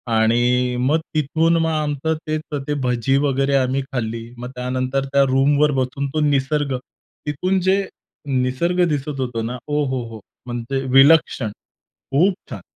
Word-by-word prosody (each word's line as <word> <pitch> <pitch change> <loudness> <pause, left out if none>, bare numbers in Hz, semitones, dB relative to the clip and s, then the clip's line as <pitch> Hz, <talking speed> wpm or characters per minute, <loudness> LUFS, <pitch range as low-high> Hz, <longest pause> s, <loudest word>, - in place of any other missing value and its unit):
आणि 120 +3 +2
मग 145 +6 +2 0.2
तिथून 160 +3 +2
मग 165 0 +1
आमचं 155 0 -1
तेच 155 0 -1 0.3
ते 150 - 0
भजी 125 +1 +1
वगैरे 140 0 +1
आम्ही 130 +1 +1
खाल्ली. 115 -2 -4
मग 125 +1 -6
त्यानंतर 130 +2 -2
त्या 140 0 +3
रूमवर 145 +3 +3
बसून 135 +2 -2
तो 155 - 0
निसर्ग, 140 0 0 0.5
तिथून 180 +6 0
जे 190 +2 +2 0.4
निसर्ग 135 +7 +1
दिसत 145 -1 -3
होता 125 -3 -2
ना. 120 +2 -4
ओहोहो! 130 -6 -2 0.3
म्हणजे 120 +2 -3 0.2
विलक्षण. 135 -5 +5 0.6
खूप 180 +8 +4 0.2
छान. - - -7
135 Hz, 135 wpm, -21 LUFS, 125-150 Hz, 0.6 s, विलक्षण